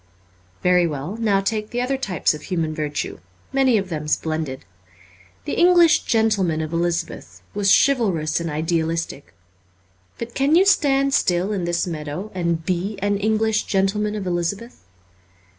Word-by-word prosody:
Very 180 -1 +4
well; 150 +5 -5
now 210 -4 +2
take 210 +1 -2
the 240 - -3
other 250 +2 0
types 200 - 0
of 150 - -8
human 165 -4 -2
virtue: 150 -7 -4 0.3
many 265 -4 +3
of 195 -2 -3
them 155 -3 -4
splendid. 155 -3 -2 0.8
The - - -3
English 345 -3 +5
gentleman 210 -8 +1
of 155 +1 -5
Elizabeth 170 0 -3
was 200 -1 +1
chivalrous 195 - +2
and 170 -1 -3
idealistic. 160 -1 -2 0.8
But 235 0 -6
can 280 +3 +2
you 370 +3 +5
stand 275 -7 +3
still 180 -1 +1
in 185 -4 -2
this 170 0 0
meadow 160 +4 -5
and 170 -3 -2
be 185 +4 -2
an 200 +1 0
English 220 +1 +1
gentleman 210 +2 0
of 205 -2 -4
Elizabeth 180 +7 -3
190 Hz, 145 wpm, -22 LUFS, 165-220 Hz, 0.8 s, English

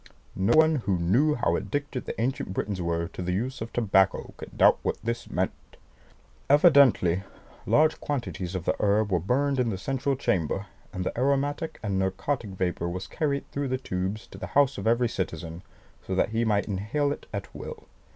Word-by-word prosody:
No 95 +5 +2
one 160 0 +5
who 100 -7 0
knew 120 - +3
how - - +1
addicted 145 -3 -3
the - - -5
ancient 115 -5 -2
Britons 100 -3 -2
were 85 -1 -1
to - - -7
the 90 0 -1
use 120 +7 -2
of 110 - -5
tobacco 95 -5 +2
could - - -11
doubt - - +6
what - - -1
this 115 +1 -3
meant. - - 0 1.0
Evidently 140 - +5 0.5
large 155 +1 +4
quantities 120 - -3
of 90 -2 -4
the - - +1
herb 105 0 +2
were 90 - +3
burned 135 - +1
in 125 -2 +2
the 100 - -2
central 135 +7 -1
chamber, 95 - -1 0.3
and 95 -2 -4
the - - -2
aromatic 140 +5 0
and 100 -3 0
narcotic 100 +6 -1
vapour 90 -2 -2
was 90 +2 -4
carried 140 -3 -2
through 140 0 -2
the 130 0 0
tubes 95 -3 -3
to - - -12
the - - -5
house 140 -1 +4
of - - -3
every 120 +1 +3
citizen, 85 -4 -4 0.5
so 95 - -1
that 95 - +2
he 115 +1 0
might 105 -2 +1
inhale 110 +9 -1
it - - -6
at 100 -2 -6
will. - - -8
110 Hz, 190 wpm, -27 LUFS, 95-140 Hz, 1.0 s, doubt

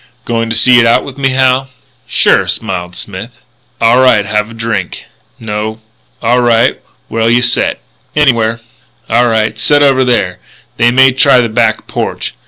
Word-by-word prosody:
"Goin' 115 -1 -2
to 115 - -2
see 125 +2 +5
it 115 - +3
out 115 - +2
with 140 0 -10
me, 135 -1 +1
Hal?" 130 0 +1 0.4
"Sure," - - +2
smiled 90 0 -4
Smith. 100 +3 -8 0.5
"Aw' 120 +3 +3
right. 115 -6 +3
Have 105 +1 -1
a - - -11
drink?" 115 -5 -4 0.4
"No." 110 0 -5 0.4
"Aw' 120 +2 +2
right. 120 0 +1 0.3
Where'll 115 0 -1
you 120 +1 +2
set?" 120 0 0 0.4
"Anywhere." 115 -6 +1 0.5
"Aw' 115 +2 +3
right. 110 -1 -1
Set 145 +4 +3
over 135 -2 +3
there. 115 -8 -1 0.4
They 120 +1 +3
may 130 +2 +4
try 135 0 +3
the 115 - -2
back 110 -1 0
porch. - - -4
115 Hz, 165 wpm, -11 LUFS, 110-130 Hz, 0.5 s, see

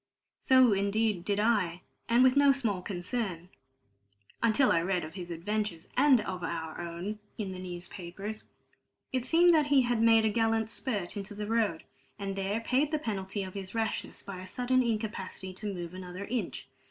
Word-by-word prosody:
So, 260 -4 +5
indeed, 200 -1 +1
did 205 +1 0
I, 205 -6 +1 0.3
and 235 +2 +5
with 260 0 +5
no 285 0 +6
small 220 -9 0
concern, 180 -1 -3 0.9
until 230 +4 +4
I 165 - +3
read 180 +1 0
of 155 - -7
his 180 -3 -7
adventures 175 0 -3
(and 270 -2 +6
our 170 -3 -4
own) 175 +5 -5 0.2
in 200 -3 -3
the 185 - -7
newspapers. 185 +3 -7 0.7
It 255 -1 0
seemed 340 +5 +5
that 305 -3 +4
he 280 -3 +5
had 240 -2 +1
made 225 -1 +5
a - - +4
gallant 225 0 +1
spurt 205 -9 -2
into 205 0 -6
the 210 0 -4
road, 215 -6 0 0.3
and 195 -1 -4
there 195 +3 -1
paid 265 +5 +1
the 310 - 0
penalty 200 -6 -3
of 185 -1 -7
his 195 +1 -6
rashness 225 -1 -2
by 195 -2 -7
a 185 - -9
sudden 250 +5 +1
incapacity 215 -5 -3
to 205 +2 -4
move 175 -2 -6
another 185 +1 -7
inch. 240 +2 -3
205 Hz, 175 wpm, -30 LUFS, 185-230 Hz, 0.9 s, no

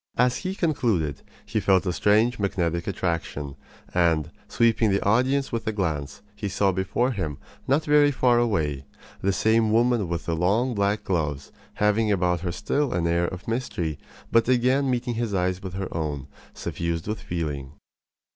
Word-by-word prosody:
As 125 +1 +3
he 190 0 -4
concluded 110 - 0 0.2
he - - -1
felt 95 -1 +3
a 90 - 0
strange 110 +6 +3
magnetic 85 -4 -1
attraction; 85 -7 -3 0.4
and, 80 -3 +2 0.2
sweeping 115 -2 +2
the 100 0 0
audience 130 +6 +2
with 115 -1 -3
a - - +2
glance, 80 -4 -3
he 105 -1 -4
saw 100 0 +2
before 95 +7 0
him, 80 - -3 0.3
not 145 +4 +2
very 150 -1 +5
far 125 -3 +3
away, 80 - 0 0.4
the 100 - +2
same 110 +3 +2
woman 115 -2 +3
with 85 -1 -3
the 85 - -1
long 105 +10 +1
black 100 0 0
gloves, 75 -6 -2 0.2
having 105 +1 +2
about 90 -3 +1
her 90 +1 -3
still 140 +10 -1
an 85 -1 0
air 85 +1 +2
of 90 0 -7
mystery, 90 - -2 0.3
but 115 +1 +3
again 130 +2 +3
meeting 125 -1 -1
his 115 -3 -2
eyes 90 0 0
with 95 -1 -6
her 95 -1 -4
own, 75 -4 -3 0.3
suffused 85 0 -3
with 105 +1 -3
feeling. 75 -5 -4
100 Hz, 165 wpm, -25 LUFS, 85-120 Hz, 0.4 s, very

